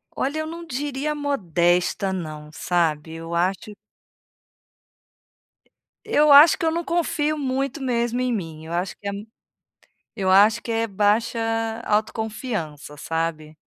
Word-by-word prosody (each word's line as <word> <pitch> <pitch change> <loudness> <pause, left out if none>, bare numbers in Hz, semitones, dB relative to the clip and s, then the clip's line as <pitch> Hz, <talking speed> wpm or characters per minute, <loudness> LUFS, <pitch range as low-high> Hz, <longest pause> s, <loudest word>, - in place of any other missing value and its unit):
Olha 285 +4 -1
eu 315 - -3
não 335 +1 -7
diria 290 +1 -3
modesta 185 - 0
não, 155 -4 -6
sabe? 160 -1 -1
Eu 165 +1 -6
acho 190 +4 -1 2.3
eu 300 0 +4
acho 290 +3 +9
que 345 - -2
eu 320 - +2
não 340 +1 -2
confio 310 -3 0
muito 270 0 -2
mesmo 240 -1 0
em 255 -1 0
mim, 165 -6 -5
eu 165 - -7
acho 180 +2 -2
que 200 - -8
é - - -1 1.0
eu 190 -3 -1
acho 210 +4 +5
que 235 - -5
é 225 0 +1
baixa 210 +3 +1 0.5
autoconfiança, 215 - -3
sabe? 155 0 -3
215 Hz, 130 wpm, -23 LUFS, 170-275 Hz, 2.3 s, acho